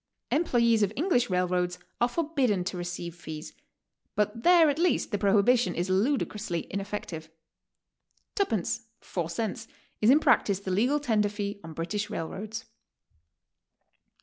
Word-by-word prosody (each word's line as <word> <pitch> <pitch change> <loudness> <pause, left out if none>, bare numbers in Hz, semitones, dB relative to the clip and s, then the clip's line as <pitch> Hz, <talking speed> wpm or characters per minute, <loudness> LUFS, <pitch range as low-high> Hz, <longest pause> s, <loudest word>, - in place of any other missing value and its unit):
Employes 235 -8 +3
of 205 -1 +2
Eng 335 +8 0
lish 245 - +3
railroads 180 -1 0 0.2
are 240 - +5
forbidden 265 - 0
to 185 - -4
receive 175 -1 -5
fees, 155 -2 -8 0.6
but 210 +2 0
there 345 +2 +6
at 285 - -4
'least 350 -6 +1
the 205 - -1
prohibition 210 +5 +3
is 180 +2 -1
ludicrously 210 - 0
ineffective. 195 -5 -5 1.0
"Tuppence," 230 - -1
four 170 -3 -4
cents, 210 +4 -3 0.3
is 215 - +5
in 280 +4 +7
practice 200 -10 +3
the 190 - -4
legal 245 +10 +2
tender 220 -7 +1
fee 205 0 -4
on 160 0 -8
British 205 +6 -3
railroads. 210 +4 -5
210 Hz, 135 wpm, -28 LUFS, 180-245 Hz, 1.0 s, in